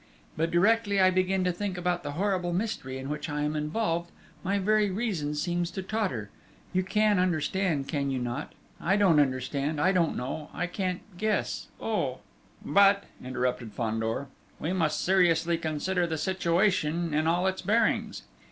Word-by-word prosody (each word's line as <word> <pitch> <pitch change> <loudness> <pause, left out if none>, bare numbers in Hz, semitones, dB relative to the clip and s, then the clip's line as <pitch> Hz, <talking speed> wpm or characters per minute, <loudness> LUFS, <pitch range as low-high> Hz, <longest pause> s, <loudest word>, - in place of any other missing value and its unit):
But 165 +1 0
directly 205 +3 +3
I 185 0 +6
begin 185 +1 +1
to 180 - +2
think 190 +1 -3
about 180 0 0
the 145 -2 -5
horrible 180 0 0
mystery 175 -9 -2
in 130 0 -6
which 150 +2 -4
I 150 0 -2
am 150 +1 -1
involved, 170 +2 -1 0.3
my 200 +2 +1
very 210 +1 +2
reason 185 -8 -2
seems 175 +2 -1
to 190 +1 -5
totter 185 - -2 0.4
you 185 - +3
can 210 +1 +2
understand 175 -3 0
that, - - -8
can 140 -2 0
you 135 - -1
not? 120 -1 -4 0.3
I 190 - +2
don't 185 -7 +5
understand, 140 +2 0
I 185 +6 +4
don't 175 -4 +1
know, 140 +5 -4
I - - -1
can't 180 0 -2 0.2
guess... 215 0 -1
oh!..." - - -2 0.4
"But," 200 0 +5 0.2
interrupted 125 -3 -2
Fandor, 115 +2 -1 0.3
"we 165 +4 -2
must 155 -4 0
seriously 170 -3 +3
consider 170 +3 -1
the 160 -1 -2
situation 170 -2 +1
in 155 +1 +1
all 175 +2 +2
its 190 0 0
bearings. 225 +3 +1
175 Hz, 165 wpm, -28 LUFS, 150-190 Hz, 0.4 s, I